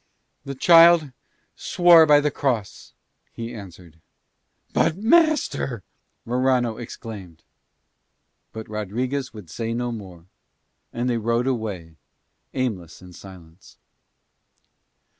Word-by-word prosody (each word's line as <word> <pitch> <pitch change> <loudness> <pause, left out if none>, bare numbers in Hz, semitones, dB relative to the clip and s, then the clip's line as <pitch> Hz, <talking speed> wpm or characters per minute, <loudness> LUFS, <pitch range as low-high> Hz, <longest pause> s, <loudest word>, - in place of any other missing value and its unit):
"The 140 0 -6
child 165 0 +6 0.4
swore 170 -2 +5
by 145 -1 +6
the 150 0 0
cross," 120 -8 -3 0.4
he 115 +1 -7
answered. 90 -6 -12 0.7
"But, 165 - +1
master!" 240 - +1 0.4
Morano 125 -1 0
exclaimed. 105 -8 -10 1.1
But 110 0 -8
Rodriguez 125 +6 -4
would 100 -8 -12
say 115 +5 -4
no 120 0 -3
more. 95 -7 -10 0.7
And 120 +1 -3
they 120 -2 0
rode 115 +2 -1
away 100 -11 -4 0.6
aimless 95 -11 -4
in 90 -1 -14
silence. 90 -2 -15
115 Hz, 100 wpm, -22 LUFS, 95-135 Hz, 1.1 s, child